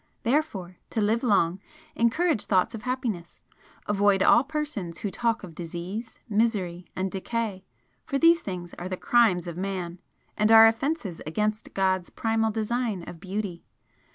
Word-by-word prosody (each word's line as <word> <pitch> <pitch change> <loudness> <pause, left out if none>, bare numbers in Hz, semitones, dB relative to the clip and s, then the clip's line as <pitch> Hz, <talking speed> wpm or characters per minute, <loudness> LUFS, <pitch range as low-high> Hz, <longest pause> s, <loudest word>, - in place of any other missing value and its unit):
Therefore, 225 - -1
to - - -2
live 220 +2 +2
long, 195 -6 +2 0.4
encourage 240 +3 +2
thoughts 185 -3 +2
of 225 - -6
happiness! 235 -9 -3 0.5
Avoid 200 -1 +3
all 240 - +6
persons 275 - -3
who 205 - -3
talk 230 +3 0
of 175 -3 -9
disease, 175 +7 -6
misery 205 -6 0
and 190 0 -2
decay 200 -1 -3 0.4
for 275 - -2
these 330 +3 +6
things 180 -3 -6
are 180 +1 -5
the 185 - -3
crimes 210 -8 +3
of 170 -1 -6
man, 185 -2 -4 0.4
and 215 +1 +2
are 225 0 +10
offences 225 - 0
against 215 +6 -2
God's 190 -2 +1
primal 225 0 0
design 220 -2 -1
of 170 - -9
beauty. 190 -2 -4
205 Hz, 150 wpm, -26 LUFS, 180-230 Hz, 0.5 s, are